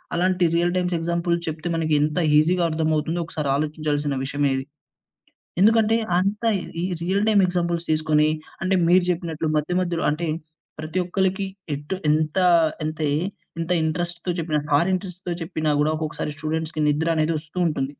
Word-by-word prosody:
అలాంటి 180 0 +2
real 175 +1 +2
times 180 -1 0
examples 170 +1 0
చెప్తే 160 +2 -4
మనకి 160 -2 0
ఎంత 150 +3 0 0.2
ఈజీ‌గా 175 +3 +3
అర్థమవుతుందో 160 +1 0
ఒకసారి 150 -3 -3
ఆలోచించాల్సిన 150 -1 -1
విషయమే 140 0 0
ఇది. 135 0 -3 1.0
ఎందుకంటే, 225 +1 +5 0.2
అంత 200 +4 -1 0.4
ఈ - - -2 0.2
రియల్ 195 +4 +1
టైమ్ 205 -2 +5
ఎగ్జాంపుల్స్ 170 -1 -1
తీసుకొని 155 -1 +3 0.3
అంటే, 190 0 +2
మీరు 180 +1 +5
జెప్పినట్లు 165 -3 -2
మధ్య, 150 +4 -1
మధ్యలో 170 -2 -1
అంటే 165 +3 -2 0.5
ప్రతి 155 +4 -3
ఒక్కళ్ళకి 190 +2 0 0.3
ఎటు 145 +6 -4 0.2
ఎంత 155 +2 0 0.5
ఎంతయి 155 -1 -1 0.4
ఎంత 165 +2 -2
ఇంట్రెస్ట్‌తో 175 +2 -2
చెప్పినా, 155 -2 0
సార్ 145 +5 +3
ఇంట్రెస్ట్‌తో 180 -1 -4
చెప్పినా 155 -1 -2
గూడా, 150 +1 +2
ఒక్కొక్కసారి 155 -1 -3
స్టూడెంట్స్‌కి 155 +1 -3
నిద్ర 155 +3 +1
అనేది 155 +1 +2
ఒస్తూ 155 +3 -15
ఉంటుంది. 150 -4 -1
165 Hz, 145 wpm, -23 LUFS, 155-180 Hz, 1.0 s, ఎందుకంటే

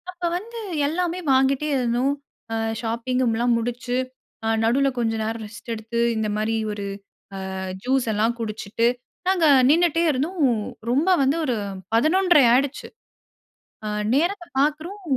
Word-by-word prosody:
அப்ப 360 -1 -10
வந்து 460 +5 -9 0.3
எல்லாமே 350 +3 -1
வாங்கிட்டே 270 +2 +2
இருந்தோம் 250 +2 +1 0.7
ஷாப்பிங் 240 +2 -1
எல்லாம் 235 +1 +2
முடித்து 245 +1 -3 0.7
நடுவுல 270 +5 +3
கொஞ்சம் 225 -1 0
நேரம் 225 +1 -3
ரெஸ்ட் 220 +3 -9
எடுத்து 225 +1 -4 0.2
இந்த 220 -1 -1
மாதிரி 215 +1 0 0.2
ஒரு 205 -1 -5 1.0
ஜூஸ் 260 0 +1
எல்லாம் 220 +3 +1
குடிச்சுட்டு 220 +1 -1 0.4
நாங்க 365 -4 +3 0.2
நின்னுட்டே 335 +1 +3
இருந்தோம் 310 +6 -2 0.5
ரொம்ப 295 +9 +2
வந்து 270 +3 +2
ஒரு 250 -4 0 0.4
11:30 315 +5 +4
ஆயிடுச்சு. 275 +3 +1 1.0
ஆ - - -2 0.3
நேரத்தை 345 +5 0
பார்க்கிறோம் 310 +8 -1
255 Hz, 120 wpm, -23 LUFS, 230-320 Hz, 1.0 s, 11:30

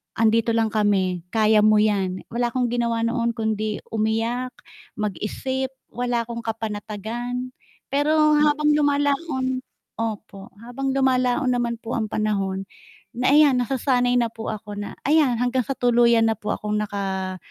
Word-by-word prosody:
Andito 225 0 +2
lang 225 -1 +1
kami, 190 -5 +1
kaya 215 -1 +4
mo 215 0 +5
yan." 190 -3 0
Wala 240 +1 0
akong 245 0 -1
ginawa 235 -1 0
noon 235 0 0
kundi 215 -2 -2
umiyak, 225 +3 -1 0.4
mag-isip, 215 +6 -3 0.2
wala 245 -1 -1
akong 235 0 -6
kapanatagan. 225 +3 -4 0.4
Pero 290 +2 +2 0.3
habang 300 0 +3
lumalaon 285 -2 0 0.3
opo, 215 -3 -5
habang 245 +4 -3
lumalaon 260 0 +2
naman 240 -2 0
po 235 +1 -5
ang 220 -2 -2
panahon, 195 -3 -1 0.5
na 250 +2 +2
ayan 290 -2 +6
nasasanay 250 -1 +1
na 235 - +2
po 225 -1 -6
ako 210 -1 -7
na 205 0 -6
ayan 285 -6 +3
hanggang 250 +1 +1
sa 255 - -5
tuluyan 235 -2 +4
na 225 - +1
po 210 - -4
akong 210 0 -2
naka 195 -3 -3
230 Hz, 140 wpm, -23 LUFS, 215-255 Hz, 0.5 s, ayan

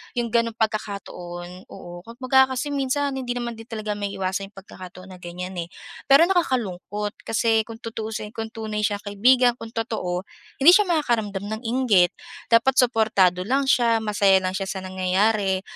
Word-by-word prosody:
yong 240 -1 -1
gano'n 230 0 +1
pagkakataon. 185 -5 -5
Oo, 175 0 -10
kumbaga 260 +3 +3
kasi 260 +3 -3
minsan 280 0 -1
hindi 245 -2 -3
naman 240 -1 -3
din 225 - -10
talaga 215 -2 -4
maiiwasan 195 -1 -3
yong - - -43
pagkakataon 185 0 -12
na 185 - -12
ganyan 180 +1 -7
eh. 170 - -4 0.4
Pero, 280 +4 +8
nakakalungkot 210 - -1
kasi 225 0 +2
kung 225 -1 -9
tutuusin, 220 -1 -5
kung 225 0 -4
tunay 215 -1 -4
siyang 205 -1 -2
kaibigan, 245 +5 +3
kung 225 - -8
totoo, 215 -6 -3 0.4
hindi 330 +6 +9
siya 415 0 +5
makakaramdam 220 - 0
ng 220 +2 -4
inggit. 225 -7 +3 0.4
Dapat 235 +3 +4
suportado 215 -7 +3
lang 270 +4 +1
siya, 235 -3 +3
masaya 200 -3 +3
lang 185 0 -2
siya 195 0 -3
sa 190 - -4
nangyayari. 190 +1 +1
220 Hz, 160 wpm, -23 LUFS, 190-240 Hz, 0.4 s, hindi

